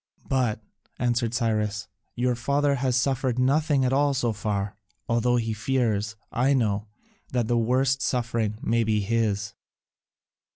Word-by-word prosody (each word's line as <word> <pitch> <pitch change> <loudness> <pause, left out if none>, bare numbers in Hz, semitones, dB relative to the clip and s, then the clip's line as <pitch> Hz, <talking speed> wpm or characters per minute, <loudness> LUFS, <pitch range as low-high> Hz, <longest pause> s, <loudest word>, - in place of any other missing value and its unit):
"But," 120 -5 0 0.3
answered 120 -1 0
Cyrus, 110 -1 0 0.3
"your 125 +1 +1
father 140 +4 +1
has 130 -2 0
suffered 130 -1 +1
nothing 140 +1 +2
at 130 - +1
all 140 0 +3
so 120 -4 0
far: 100 -1 -2 0.3
although 120 +1 +2
he 115 -2 0
fears, 110 -3 0 0.2
I 135 +4 +2
know, 105 -4 0 0.5
that 120 -3 +1
the 120 - +1
worst 130 +3 +2
suffering 115 -5 -1
may 115 +1 +2
be 110 -1 +1
his." 105 -1 0
120 Hz, 135 wpm, -26 LUFS, 110-130 Hz, 0.5 s, all